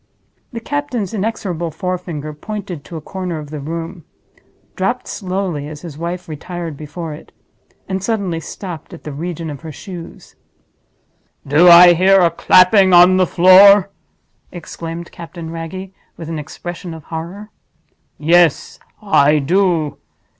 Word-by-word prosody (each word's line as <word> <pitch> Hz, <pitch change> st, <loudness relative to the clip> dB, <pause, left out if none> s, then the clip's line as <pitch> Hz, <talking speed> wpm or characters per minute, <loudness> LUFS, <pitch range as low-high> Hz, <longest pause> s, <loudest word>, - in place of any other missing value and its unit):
The 235 Hz, -, -5 dB
captain's 250 Hz, -6 st, -3 dB
inexorable 190 Hz, -5 st, -3 dB
forefinger 170 Hz, -3 st, -5 dB
pointed 185 Hz, -1 st, -7 dB
to 170 Hz, -, -10 dB
a -, -, -7 dB
corner 180 Hz, 0 st, -5 dB
of 150 Hz, -1 st, -9 dB
the 155 Hz, -, -5 dB
room—dropped 170 Hz, -, -7 dB
slowly 185 Hz, -6 st, -3 dB
as 150 Hz, -1 st, -9 dB
his 165 Hz, -5 st, -8 dB
wife 170 Hz, +3 st, -5 dB
retired 165 Hz, +1 st, -6 dB
before 155 Hz, +2 st, -7 dB
it—and 190 Hz, +4 st, -10 dB
suddenly 195 Hz, -5 st, -2 dB
stopped 170 Hz, +1 st, -8 dB
at -, -, -15 dB
the 150 Hz, -, -6 dB
region 165 Hz, +1 st, -5 dB
of 140 Hz, -, -9 dB
her 160 Hz, -1 st, -8 dB
shoes. 175 Hz, +1 st, -11 dB, 1.1 s
"Do 155 Hz, +6 st, +6 dB
I 175 Hz, +1 st, +9 dB
hear 190 Hz, +3 st, +4 dB
a 170 Hz, -2 st, +3 dB
clapping 185 Hz, 0 st, +5 dB
on 180 Hz, +1 st, +7 dB
the 185 Hz, -1 st, +3 dB
floor!" 190 Hz, +3 st, +6 dB, 0.6 s
exclaimed 170 Hz, -1 st, -8 dB
Captain 170 Hz, -1 st, -9 dB
Wragge, 170 Hz, +3 st, -7 dB, 0.3 s
with 165 Hz, -1 st, -8 dB
an 160 Hz, -2 st, -4 dB
expression 175 Hz, +3 st, -8 dB
of 160 Hz, -, -11 dB
horror. 175 Hz, +8 st, -7 dB, 0.7 s
"Yes; 165 Hz, 0 st, +2 dB, 0.2 s
I 150 Hz, -7 st, +4 dB
do. 165 Hz, 0 st, 0 dB
175 Hz, 130 wpm, -17 LUFS, 160-190 Hz, 1.1 s, I